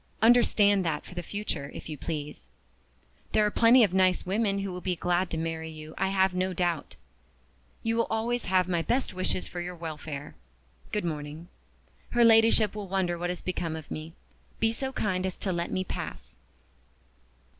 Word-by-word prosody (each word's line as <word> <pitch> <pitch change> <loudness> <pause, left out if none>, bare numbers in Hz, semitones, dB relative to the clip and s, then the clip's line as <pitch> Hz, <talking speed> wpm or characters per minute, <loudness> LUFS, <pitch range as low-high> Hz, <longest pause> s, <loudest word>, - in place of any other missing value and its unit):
Understand 215 -4 +5
that 155 -3 -2
for - - -11
the 175 - -4
future, 175 -7 -4
if - - -7
you 155 - -5
please. 150 - -6 0.8
There 215 - +4
are 210 - +1
plenty 235 +3 +6
of 195 -4 +2
nice 185 -1 +3
women 200 +1 +1
who 195 -1 -2
will 180 - -6
be 180 -1 -1
glad 175 +2 0
to 165 - -3
marry 160 0 -3
you, 155 0 -9
I 195 - 0
have 190 -1 +2
no 185 +1 0
doubt. 170 - -1 0.9
You 225 0 0
will 230 - +2
always 235 +2 -1
have 185 -1 +3
my 175 -2 +1
best 245 +5 0
wishes 185 0 -1
for 175 - -5
your 180 +1 -5
welfare. 155 -3 -6 0.6
Good 210 -3 -1
morning. 155 +1 -5 0.7
Her 240 - +7
Ladyship 225 -2 +5
will 210 -2 -5
wonder 185 -2 0
what 175 +1 -3
has 180 - -4
become 175 -3 -2
of 160 -2 -9
me. 155 +1 -6 0.5
Be 225 0 +3
so 265 +3 -3
kind 190 -7 -1
as 190 -1 -3
to 190 - -2
let 170 0 -2
me 185 - -1
pass." - - -6
185 Hz, 185 wpm, -28 LUFS, 165-205 Hz, 0.9 s, Her